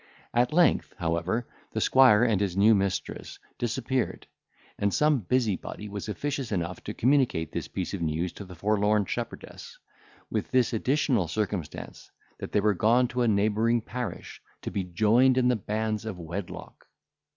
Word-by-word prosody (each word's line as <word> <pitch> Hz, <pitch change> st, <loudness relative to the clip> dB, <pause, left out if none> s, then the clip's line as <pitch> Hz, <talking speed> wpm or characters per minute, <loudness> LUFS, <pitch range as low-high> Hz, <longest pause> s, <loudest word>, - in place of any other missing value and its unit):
At 120 Hz, +4 st, +2 dB
length, 170 Hz, -1 st, +3 dB
however, 85 Hz, +7 st, -1 dB, 0.3 s
the -, -, -1 dB
squire 125 Hz, -5 st, +6 dB
and 110 Hz, -5 st, +2 dB
his 95 Hz, -2 st, -1 dB
new 105 Hz, +3 st, +6 dB
mistress 100 Hz, -2 st, -2 dB, 0.2 s
disappeared; 125 Hz, +1 st, -2 dB, 0.5 s
and 100 Hz, 0 st, +1 dB
some 150 Hz, +2 st, +3 dB
busybody 105 Hz, -2 st, -1 dB
was 100 Hz, +1 st, -6 dB
officious 135 Hz, +2 st, -3 dB
enough 90 Hz, -2 st, -3 dB
to -, -, -5 dB
communicate 125 Hz, -, +2 dB
this -, -, -4 dB
piece 95 Hz, 0 st, -4 dB
of 95 Hz, -, -4 dB
news 80 Hz, +2 st, -1 dB
to -, -, -8 dB
the 90 Hz, -1 st, -11 dB
forlorn 105 Hz, +2 st, +2 dB
shepherdess, -, -, -6 dB, 0.5 s
with -, -, -2 dB
this 125 Hz, -2 st, +2 dB
additional 125 Hz, -, +1 dB
circumstance, 100 Hz, -4 st, -4 dB, 0.3 s
that -, -, -6 dB
they 105 Hz, -, +2 dB
were 105 Hz, 0 st, +3 dB
gone 120 Hz, +6 st, +3 dB
to 125 Hz, 0 st, -2 dB
a 120 Hz, -, +3 dB
neighbouring 110 Hz, +3 st, +2 dB
parish 125 Hz, +2 st, -6 dB, 0.2 s
to -, -, -4 dB
be 100 Hz, -, -2 dB
joined 110 Hz, +8 st, +3 dB
in 125 Hz, -1 st, +3 dB
the 125 Hz, -, +3 dB
bands 110 Hz, 0 st, -2 dB
of 110 Hz, -4 st, -5 dB
wedlock. 85 Hz, +2 st, -7 dB
110 Hz, 160 wpm, -27 LUFS, 95-125 Hz, 0.5 s, squire